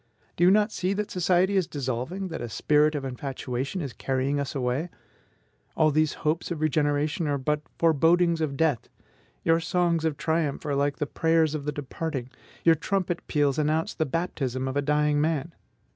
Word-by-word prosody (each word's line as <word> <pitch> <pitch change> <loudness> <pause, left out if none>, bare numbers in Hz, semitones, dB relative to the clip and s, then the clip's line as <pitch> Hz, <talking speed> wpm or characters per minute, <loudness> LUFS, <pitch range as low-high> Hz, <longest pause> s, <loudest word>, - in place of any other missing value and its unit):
Do 175 - +1
you 180 - +7
not 210 +2 +4
see 185 -1 -1
that 210 +1 -3
society 180 +2 +2
is 185 -4 +2
dissolving, 140 +8 -3
that 165 - -5
a 120 - -4
spirit 150 +6 +2
of 140 -2 -3
infatuation 135 +4 -4
is 135 -6 -5
carrying 135 +2 -1
us 140 +1 -3
away? 130 +6 -1 0.9
All 155 -1 +4
these 155 +1 +2
hopes 155 +2 0
of 170 -3 -3
regeneration 150 +1 +1
are 145 -1 +1
but 150 +3 -1 0.2
forebodings 165 +1 +3
of 140 -3 -2
death; 155 -6 +1 0.5
your 165 0 +3
songs 170 -1 +1
of 160 -3 0
triumph 160 -3 -1
are 145 - -1
like 140 0 +1
the 150 - -2
prayers 160 0 +2
of 150 -2 -4
the 150 - 0
departing, 145 -2 -5 0.3
your 165 - +6
trumpet 175 +2 -2
peals 145 -2 +1
announce 155 +2 0
the 160 -3 -1
baptism 135 -4 -2
of 130 - -3
a 145 - +2
dying 150 0 +2
man. 160 +1 -1
155 Hz, 180 wpm, -26 LUFS, 140-165 Hz, 0.9 s, you